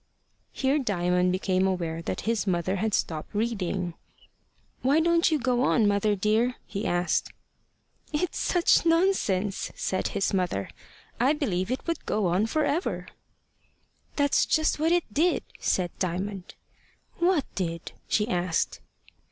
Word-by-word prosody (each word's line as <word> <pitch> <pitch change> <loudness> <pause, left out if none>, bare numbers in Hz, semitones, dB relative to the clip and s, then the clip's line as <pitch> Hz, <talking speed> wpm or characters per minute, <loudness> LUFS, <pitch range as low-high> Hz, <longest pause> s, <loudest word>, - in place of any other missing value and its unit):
Here 270 +2 +1
Diamond 180 -6 +1
became 185 0 +1
aware 170 -3 -2
that - - -4
his 225 -2 -1
mother 185 +1 0
had 215 +1 0
stopped 160 +4 -3
reading. 195 -5 -1 0.9
"Why 275 +4 +3
don't 340 +1 +3
you 315 - +2
go 250 -2 +1
on, 230 -4 +3
mother 205 +1 +2
dear?" 220 +5 +1
he 200 +1 -4
asked. 175 0 0 0.8
"It's 320 +3 -1
such 350 -2 +3
nonsense!" 330 - +1
said 185 - -1
his 195 - -1
mother. 175 - -1 0.5
"I 260 +5 +4
believe 195 - -1
it 255 - -3
would 335 -2 -2
go 210 -2 0
on 180 +5 +2
for 305 +6 +1
ever." 320 +6 -2 1.1
"That's 285 -1 +2
just 315 -1 +2
what 320 +2 +2
it 350 -1 +2
did," 335 +7 +2 0.2
said 180 -2 0
Diamond. 185 +1 -3 0.6
"What 345 -5 +3
did?" 170 -3 -4 0.2
she 210 0 +1
asked. 180 -5 -1
210 Hz, 135 wpm, -27 LUFS, 180-285 Hz, 1.1 s, I